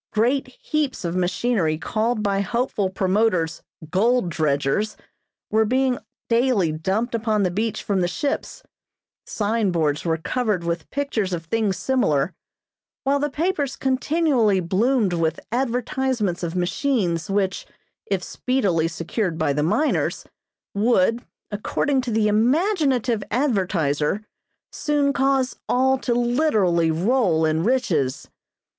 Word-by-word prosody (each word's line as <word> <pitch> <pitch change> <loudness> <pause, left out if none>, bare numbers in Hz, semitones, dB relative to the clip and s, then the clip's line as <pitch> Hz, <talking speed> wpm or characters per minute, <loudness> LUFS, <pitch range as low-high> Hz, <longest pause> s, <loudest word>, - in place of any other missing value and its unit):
Great 245 +6 +1
heaps 305 - -2
of 170 +1 -2
machinery 185 -2 0
called 220 +6 -1
by 200 -1 +1
hopeful 210 -1 -1
promoters 190 -3 +1 0.3
"gold 220 +1 +2
dredgers" 155 +6 0 0.5
were 220 +1 +4
being 255 +2 +1 0.3
daily 230 -8 +2
dumped 190 +10 -1
upon 220 -2 +1
the 180 - +1
beach 215 +4 -2
from 195 -2 0
the 175 - +2
ships, 280 +10 -3 0.6
signboards 185 -9 0
were 165 -1 0
covered 210 +1 -1
with 170 -1 -3
pictures 240 -9 -2
of 165 -1 -4
things 210 0 0
similar, 185 - +1 0.7
while 280 +1 +2
the 295 +1 0
papers 295 -2 -1
continually 265 - +2
bloomed 200 +4 +1
with 165 -1 0
advertisements 245 -5 -1
of 170 0 -3
machines, 180 - 0
which, 195 -1 -1 0.4
if 195 -2 0
speedily 195 -12 0
secured 165 +2 -3
by 155 -3 +1
the 150 - 0
miners, 285 - 0 0.5
would, 225 +2 +2 0.3
according 260 +6 0
to 250 - -5
the 220 -1 +2
imaginative 255 - +2
advertiser, 195 - 0 0.5
soon 290 -2 0
cause 270 -1 +1
all 265 +1 +3
to 245 -2 -1
literally 230 - +2
roll 175 -1 +2
in 160 +1 +1
riches. 175 - 0
215 Hz, 120 wpm, -23 LUFS, 175-255 Hz, 0.7 s, were